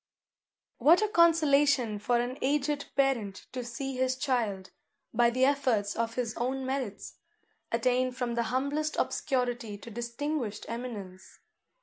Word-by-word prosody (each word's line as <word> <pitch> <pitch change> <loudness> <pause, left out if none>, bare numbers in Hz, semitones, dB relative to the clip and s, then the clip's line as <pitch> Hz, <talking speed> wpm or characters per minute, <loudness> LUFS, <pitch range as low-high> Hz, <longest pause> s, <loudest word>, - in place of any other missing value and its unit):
What 325 - +6
a - - +2
consolation 290 - +4
for 240 +3 +1
an 245 +3 -3
aged 285 +1 0
parent 250 -8 0
to 250 -1 -4
see 260 +3 -5
his 260 0 +1
child, 220 -8 -1 0.4
by 235 +1 +4
the 255 +2 +2
efforts 255 -8 +1
of 230 0 -2
his 235 -3 -2
own 260 +2 -1
merits, 260 -6 -4 0.5
attain 250 +2 +2
from 245 -1 -3
the 235 - +1
humblest 285 +4 -1
obscurity 245 -5 -1
to 230 +3 -11
distinguished 235 0 -3
eminence! 215 -6 -7
250 Hz, 130 wpm, -29 LUFS, 230-275 Hz, 0.5 s, What